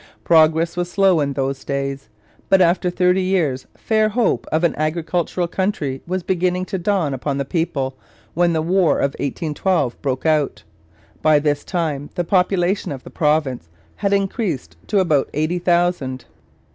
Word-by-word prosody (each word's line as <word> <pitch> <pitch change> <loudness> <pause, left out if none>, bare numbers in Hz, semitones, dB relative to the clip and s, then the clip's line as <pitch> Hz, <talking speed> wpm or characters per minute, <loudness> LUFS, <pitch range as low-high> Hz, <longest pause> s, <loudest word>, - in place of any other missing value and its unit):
Progress 160 +1 +4
was 175 0 -2
slow 190 -4 +3
in 140 -1 0
those 135 0 -2
days, 140 -2 -3 0.4
but 195 - +5
after 180 0 +3
thirty 180 +1 +2
years 170 -9 0
fair 215 -1 +1
hope 230 +2 0
of 160 +2 +1
an 170 - +3
agricultural 170 +3 -1
country 170 -8 -2
was 185 0 -2
beginning 180 0 0
to 190 +1 -4
dawn 175 -6 0
upon 135 +2 -2
the 140 - -2
people 140 -4 -2 0.4
when 175 +1 +2
the 160 -1 0
War 180 0 +2
of 140 - +1
1812 150 -1 -1
broke 130 0 -2
out. 155 - +1 0.6
By 155 -1 +5
this 145 -1 0
time 150 -5 -2
the 175 - 0
population 180 +1 +1
of 135 -2 -6
the - - -11
province 150 - 0 0.3
had 200 - -1
increased 195 - -1
to 210 - 0
about 155 -7 +2
eighty 155 +4 0
thousand. 175 -7 0
165 Hz, 160 wpm, -20 LUFS, 140-180 Hz, 0.6 s, but